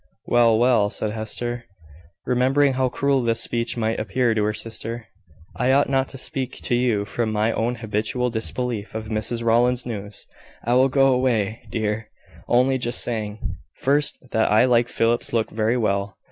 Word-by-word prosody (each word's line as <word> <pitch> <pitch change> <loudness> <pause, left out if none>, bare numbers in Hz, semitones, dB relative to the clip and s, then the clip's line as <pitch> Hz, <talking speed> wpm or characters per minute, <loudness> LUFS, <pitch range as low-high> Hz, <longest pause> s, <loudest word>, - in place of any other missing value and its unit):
"Well, 115 -2 +4
well," 120 -3 +3
said 105 0 -3
Hester, 120 +2 -4 0.6
remembering 130 +3 +3
how 130 0 +1
cruel 140 +1 +1
this 115 -1 0
speech 115 0 -2
might 110 0 0
appear 120 +1 +1
to 105 -1 0
her 105 - +1
sister, 115 +1 -3 0.5
"I 125 +2 +1
ought 140 +1 +3
not 135 -1 +2
to 135 - -8
speak 130 0 -2
to - - -1
you 120 -4 +1
from 110 +1 -2
my 110 +1 +1
own 120 +2 -1
habitual 110 +2 -2
disbelief 115 -1 -3
of 110 -1 -5
Mrs 115 +2 -1
Rowland's 120 +2 +2
news. 105 -3 -6 0.4
I 120 - +1
will 130 +2 +4
go 135 0 +4
away, 115 -4 0
dear; 110 -1 -2 0.4
only 130 +2 +3
just 120 0 -1
saying, 110 -3 -4 0.2
first, 145 +2 +1
that 110 - +2
I 110 +4 +5
like 120 -2 +3
Philip's 115 +1 0
looks 115 -2 0
very 110 +2 +1
well. 100 -3 -1
120 Hz, 170 wpm, -23 LUFS, 110-125 Hz, 0.6 s, I